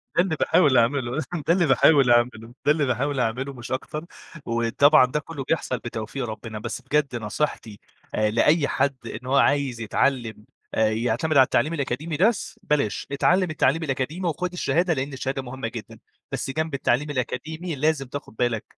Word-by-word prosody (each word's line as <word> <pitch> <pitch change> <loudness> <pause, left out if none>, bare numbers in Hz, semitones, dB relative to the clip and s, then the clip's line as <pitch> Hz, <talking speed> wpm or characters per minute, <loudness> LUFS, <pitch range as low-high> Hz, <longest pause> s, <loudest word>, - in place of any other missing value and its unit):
ده - - +5
اللي 180 -4 -1
باحاول 145 -5 +3
أعمله 125 +2 +1 0.3
ده 170 - +5
اللي 175 -1 +3
باحاول 135 0 +5
أعمله 120 -1 +1
ده 145 - +5
اللي 150 -1 +2
باحاول 135 +2 -1
أعمله 125 +4 -1
مش 120 -1 -9
أكتر. 150 +4 -4 0.4
وطبعًا 115 +4 +4
ده 130 +4 -2
كُلّه 150 -2 -7
بيحصل 130 -3 -1
بتوفيق 115 +2 -5
ربنا. 110 0 -7
بس 115 +3 -5
بجد 140 0 0
نصيحتي 110 -1 -3 0.4
أ 110 0 +2
لأي 145 +7 +3
حد 140 +1 0
إن 125 - -7
هو 135 - +1
عايز 140 -4 +2
يتعلّم 110 -2 -1 0.3
أ - - -1
يعتمد 120 +7 0
على 135 - +9
التعليم 155 +4 +1
الأكاديمي 150 +1 -3
بس 220 +4 +1
بلاش، 150 - 0
اتعلّم 180 +6 +2
التعليم 155 +1 +1
الأكاديمي 150 +5 -2
وخُد 175 +3 -2
الشهادة 170 +1 +1
لإن 135 0 -3
الشهادة 135 0 -3
مهمة 130 -1 -5
جدًا 115 -2 -9 0.3
بس - - -3
جنب 155 +2 -2
التعليم 140 +1 0
الأكاديمي 155 +5 -4
لازم 150 0 0
تاخد 140 -3 -8
بالك 115 -2 0
135 Hz, 170 wpm, -24 LUFS, 120-150 Hz, 0.4 s, على